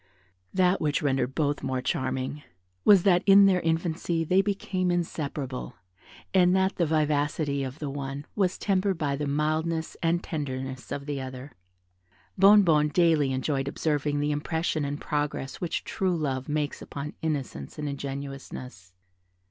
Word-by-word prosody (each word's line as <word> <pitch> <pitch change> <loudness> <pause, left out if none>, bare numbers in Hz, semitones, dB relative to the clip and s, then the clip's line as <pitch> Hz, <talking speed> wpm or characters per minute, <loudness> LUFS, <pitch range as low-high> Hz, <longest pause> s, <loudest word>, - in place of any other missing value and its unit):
That 185 0 +2
which 150 0 0
rendered 135 -2 0
both 145 -2 0
more 130 -1 -1
charming 130 -1 -2 0.4
was, 195 -4 +7
that 180 -3 +4
in 200 0 +8
their 185 -2 +4
infancy 165 0 0
they 185 +4 +3
became 195 -2 -1
inseparable, 150 -6 -3 0.6
and 180 -1 +5
that 190 0 +1
the 170 - +2
vivacity 150 -1 +1
of 130 +1 -5
the 150 - -4
one 140 +1 -5
was 190 -3 +1
tempered 195 -2 +1
by 145 -3 -1
the 145 +1 -3
mildness 155 +3 -1
and 170 +1 +1
tenderness 130 -4 -5
of 140 - -4
the 145 -2 -3
other. 130 +1 -7 0.8
Bonnebonne 185 -6 +6
daily 155 -4 +3
enjoyed 135 +1 -1
observing 145 0 -1
the 150 +1 0
impression 155 +1 -1
and 145 +1 -3
progress 145 -2 -3
which 175 -2 -2
true 185 -3 -1
love 135 -3 -2
makes 150 -1 -2
upon 145 +1 -6
innocence 135 - -3
and 150 -1 -3
ingenuousness. 135 -8 -7
150 Hz, 145 wpm, -27 LUFS, 140-170 Hz, 0.8 s, in